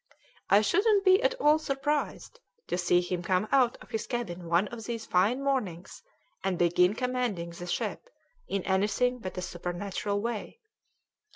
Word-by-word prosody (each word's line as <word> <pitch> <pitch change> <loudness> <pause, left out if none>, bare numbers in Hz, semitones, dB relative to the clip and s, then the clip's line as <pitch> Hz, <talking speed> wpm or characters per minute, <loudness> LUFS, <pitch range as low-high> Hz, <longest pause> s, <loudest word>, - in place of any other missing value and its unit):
I 200 +2 +6
shouldn't 400 - +3
be 375 0 +6
at - - +2
all 305 -10 +4
surprised 295 - -2 0.3
to - - -2
see 175 0 +3
him 180 0 -3
come 185 +3 0
out 255 -3 +3
of - - -19
his 220 - -3
cabin 195 -8 -4
one 175 +4 +3
of 230 -2 -8
these 230 -2 -4
fine 210 +9 +2
mornings 205 -11 -2 0.4
and 190 -2 0
begin 180 +3 +3
commanding 245 -9 -2
the 175 +1 -8
ship 175 - -3 0.4
in 195 -2 -2
anything 210 +6 +1
but 185 -4 -7
a 180 - -3
supernatural 185 +4 -3
way." 230 - -4
210 Hz, 160 wpm, -29 LUFS, 180-255 Hz, 0.4 s, I